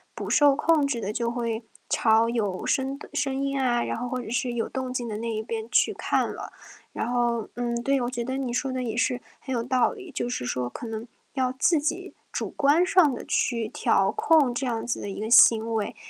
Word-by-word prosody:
不 -, -, -5 dB
受 290 Hz, -2 st, +5 dB
控 300 Hz, -1 st, +3 dB
制 245 Hz, -4 st, -2 dB
地 200 Hz, -, -2 dB
就 235 Hz, 0 st, -1 dB
会 235 Hz, -1 st, -3 dB, 0.3 s
朝 225 Hz, 0 st, +3 dB
有 205 Hz, -6 st, -2 dB
声 270 Hz, +1 st, 0 dB
的 -, -, -12 dB
声 275 Hz, -2 st, -1 dB
音 275 Hz, 0 st, -1 dB
啊， 240 Hz, -2 st, +2 dB
然 -, -, -3 dB
后 245 Hz, +2 st, -3 dB
或 255 Hz, 0 st, -2 dB
者 -, -, -8 dB
是 245 Hz, 0 st, -1 dB
有 230 Hz, -, -1 dB
动 260 Hz, -1 st, -4 dB
静 245 Hz, -2 st, -3 dB
的 210 Hz, -, -4 dB
那 230 Hz, +1 st, -4 dB
一 220 Hz, 0 st, -3 dB
边 225 Hz, 0 st, -5 dB
去 -, -, +3 dB
看 -, -, 0 dB
了。 -, -, -8 dB, 0.4 s
然 -, -, -2 dB
后， 235 Hz, -2 st, 0 dB
嗯， 240 Hz, -1 st, -2 dB
对， 275 Hz, 0 st, +2 dB
我 240 Hz, -, -1 dB
觉 240 Hz, -2 st, -3 dB
得 260 Hz, +2 st, -3 dB
你 265 Hz, -3 st, -2 dB
说 260 Hz, +2 st, -1 dB
的 255 Hz, 0 st, -2 dB
也 230 Hz, -2 st, -3 dB
是 250 Hz, 0 st, +1 dB, 0.2 s
很 265 Hz, -, -8 dB
有 235 Hz, -, 0 dB
道 255 Hz, +1 st, +2 dB
理， 395 Hz, -6 st, -10 dB
就 -, -, -2 dB
是 125 Hz, -, -3 dB
说 125 Hz, 0 st, -2 dB
可 235 Hz, -, -7 dB
能 225 Hz, 0 st, -5 dB, 0.3 s
要 260 Hz, -2 st, 0 dB
自 295 Hz, +5 st, +2 dB
己 295 Hz, +1 st, -3 dB, 0.2 s
主 -, -, -3 dB
观 290 Hz, +5 st, +3 dB
上 360 Hz, -7 st, +4 dB
地 -, -, -6 dB
去 230 Hz, -3 st, 0 dB
调 300 Hz, +6 st, +2 dB
控 325 Hz, -, +3 dB
这 240 Hz, +3 st, -3 dB
样 230 Hz, -3 st, -2 dB
子 240 Hz, -, -2 dB
的 205 Hz, -, -5 dB
一 -, -, -7 dB
个 215 Hz, +1 st, -3 dB
行 230 Hz, -2 st, +6 dB
为。 215 Hz, -2 st, -2 dB
245 Hz, 255 characters per minute, -26 LUFS, 230-270 Hz, 0.4 s, 行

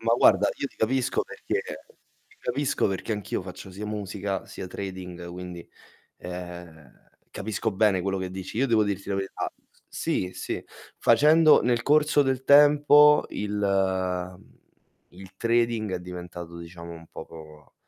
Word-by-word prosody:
Ma 115 Hz, 0 st, +1 dB
guarda, 105 Hz, -4 st, +5 dB
io -, -, -1 dB
ti -, -, -16 dB
capisco 125 Hz, +3 st, +1 dB
perché -, -, -3 dB, 0.7 s
ti -, -, -25 dB
capisco 135 Hz, +3 st, 0 dB
perché 95 Hz, +3 st, -3 dB
anch'io 105 Hz, -3 st, -3 dB
faccio 95 Hz, -, -9 dB
sia 100 Hz, +3 st, -7 dB
musica 100 Hz, -2 st, -4 dB
sia 95 Hz, -, -8 dB
trading, 90 Hz, -2 st, -7 dB
quindi, 90 Hz, -1 st, -8 dB, 0.5 s
ehm, 90 Hz, -5 st, -9 dB, 0.4 s
capisco 110 Hz, +2 st, -3 dB
bene 95 Hz, -2 st, +2 dB
quello 95 Hz, 0 st, -1 dB
che 95 Hz, -1 st, -4 dB
dici. 95 Hz, +3 st, -6 dB
Io 135 Hz, -, +3 dB
devo 110 Hz, -4 st, +3 dB
dirti 100 Hz, -1 st, -3 dB
la 100 Hz, -, 0 dB
verità 95 Hz, 0 st, -3 dB, 0.2 s
s -, -, -33 dB
sì, 90 Hz, 0 st, -1 dB
sì, -, -, -4 dB, 0.4 s
facendo 155 Hz, +6 st, +6 dB
nel 120 Hz, -1 st, +1 dB
corso 150 Hz, +1 st, +4 dB
del 130 Hz, -1 st, -1 dB
tempo 150 Hz, +1 st, +7 dB
il 105 Hz, 0 st, -4 dB, 0.8 s
mhmm, -, -, -22 dB, 0.6 s
il 95 Hz, +1 st, -13 dB
trading 115 Hz, -3 st, +1 dB
è 90 Hz, -, -3 dB
diventato 90 Hz, -1 st, -8 dB
diciamo 85 Hz, 0 st, -10 dB
un 85 Hz, -1 st, -11 dB
poco 75 Hz, -3 st, -12 dB
100 Hz, 150 wpm, -26 LUFS, 90-120 Hz, 0.8 s, tempo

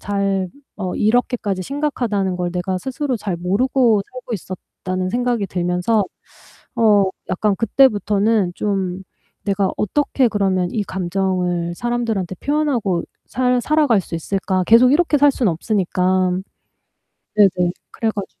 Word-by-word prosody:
잘 195 Hz, -2 st, -1 dB, 0.3 s
어 185 Hz, -3 st, -3 dB
이렇게까지 215 Hz, -3 st, +1 dB
심각하다는 235 Hz, -8 st, -1 dB
걸 175 Hz, -1 st, -2 dB
내가 180 Hz, +1 st, -2 dB
스스로 265 Hz, -, -3 dB
잘 195 Hz, -4 st, -3 dB
모르고 220 Hz, +5 st, +2 dB
살고 255 Hz, -1 st, -8 dB
있었다는 185 Hz, -1 st, -5 dB
생각이 240 Hz, -2 st, 0 dB
들면서 180 Hz, +4 st, 0 dB, 0.7 s
어 215 Hz, -4 st, +5 dB, 0.3 s
약간 200 Hz, +2 st, +1 dB
그때부터는 215 Hz, -4 st, +2 dB
좀 190 Hz, -3 st, -2 dB, 0.4 s
'내가 195 Hz, -1 st, 0 dB
어떻게 265 Hz, +4 st, +1 dB
그러면 190 Hz, -4 st, 0 dB
이 215 Hz, +1 st, -2 dB
감정을 180 Hz, -2 st, -1 dB
사람들한테 225 Hz, -4 st, -2 dB
표현하고 250 Hz, -, 0 dB, 0.2 s
살 250 Hz, 0 st, +1 dB
살아갈 290 Hz, -6 st, +2 dB
수 175 Hz, -, -12 dB
있을까?' 185 Hz, +2 st, -1 dB
계속 240 Hz, +3 st, +6 dB
이렇게 300 Hz, 0 st, +3 dB
살 285 Hz, +1 st, +5 dB
수는 240 Hz, -8 st, +1 dB
없으니까. 185 Hz, 0 st, 0 dB, 1.0 s
네네. 185 Hz, -4 st, +4 dB, 0.2 s
그래 225 Hz, -, -1 dB
가지고 200 Hz, -2 st, -7 dB
200 Hz, 295 characters per minute, -20 LUFS, 185-240 Hz, 1.0 s, 계속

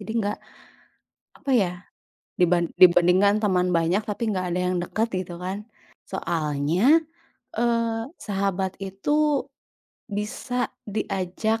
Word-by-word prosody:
jadi 215 Hz, +1 st, -6 dB
enggak, 205 Hz, -2 st, -1 dB, 1.0 s
apa 280 Hz, -, -5 dB
ya, 200 Hz, -8 st, +3 dB, 0.7 s
diban 175 Hz, -1 st, +3 dB
dibandingkan 185 Hz, +4 st, +6 dB
teman 185 Hz, -3 st, +2 dB
banyak 170 Hz, +5 st, +2 dB
tapi 220 Hz, +2 st, -1 dB
enggak 185 Hz, -3 st, -1 dB
ada 180 Hz, -, 0 dB
yang 180 Hz, 0 st, 0 dB
dekat 220 Hz, +5 st, -1 dB, 0.2 s
gitu 175 Hz, 0 st, -9 dB
kan. 195 Hz, +3 st, -4 dB, 0.4 s
Soalnya, 170 Hz, -, +2 dB, 0.6 s
e 235 Hz, -, +2 dB, 0.6 s
sahabat 195 Hz, -2 st, -1 dB
itu 280 Hz, +9 st, 0 dB, 0.6 s
bisa 245 Hz, +4 st, -2 dB, 0.2 s
diajak 205 Hz, +2 st, -1 dB
195 Hz, 110 wpm, -25 LUFS, 180-220 Hz, 1.0 s, dibandingkan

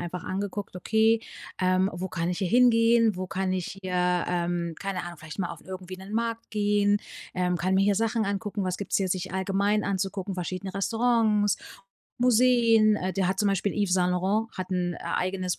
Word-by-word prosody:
einfach 175 Hz, 0 st, -5 dB
angeguckt: 200 Hz, 0 st, -4 dB
„Okay, 220 Hz, +4 st, +2 dB, 0.4 s
ähm, 185 Hz, +1 st, +3 dB
wo 185 Hz, +1 st, -4 dB
kann 170 Hz, -1 st, -2 dB
ich 180 Hz, -, -2 dB
hier 190 Hz, -, -1 dB
hingehen? 230 Hz, -2 st, +4 dB
Wo 185 Hz, 0 st, -4 dB
kann 190 Hz, -1 st, -1 dB
ich 185 Hz, +1 st, -4 dB
hier, 180 Hz, -1 st, 0 dB
ähm, 175 Hz, -1 st, -1 dB
keine 195 Hz, -3 st, -3 dB
Ahnung, 175 Hz, -1 st, -8 dB
vielleicht 155 Hz, +4 st, -10 dB
mal 175 Hz, -3 st, -1 dB
auf -, -, -13 dB
irgendwie 185 Hz, 0 st, -7 dB
'nen 190 Hz, +2 st, -10 dB
Markt 230 Hz, 0 st, -2 dB
gehen, 205 Hz, -1 st, +2 dB, 0.4 s
ähm, 180 Hz, -1 st, 0 dB
kann 185 Hz, +4 st, 0 dB
mir 195 Hz, -, +4 dB
hier 205 Hz, -, +3 dB
Sachen 225 Hz, +1 st, 0 dB
angucken, 200 Hz, 0 st, -2 dB
was 185 Hz, -1 st, -1 dB
gibt's 200 Hz, -, -1 dB
hier 195 Hz, -1 st, 0 dB
sich 185 Hz, 0 st, -2 dB
allgemein 195 Hz, +2 st, +1 dB
anzugucken, 195 Hz, 0 st, -2 dB
verschiedene 185 Hz, +2 st, -5 dB
Restaurants, 220 Hz, -1 st, +2 dB, 0.6 s
Museen?“, 235 Hz, -3 st, +4 dB
äh, 185 Hz, -2 st, -2 dB
der 190 Hz, -2 st, 0 dB
hat 190 Hz, 0 st, -1 dB
zum 205 Hz, -, +2 dB
Beispiel 195 Hz, +1 st, 0 dB
Yves 200 Hz, -4 st, 0 dB
Saint-Laurent 185 Hz, +4 st, +1 dB
hat 185 Hz, 0 st, -3 dB
'n, 175 Hz, -1 st, -1 dB
äh, -, -, -9 dB, 0.2 s
eigenes 185 Hz, -1 st, -1 dB
190 Hz, 190 wpm, -27 LUFS, 180-210 Hz, 0.6 s, hingehen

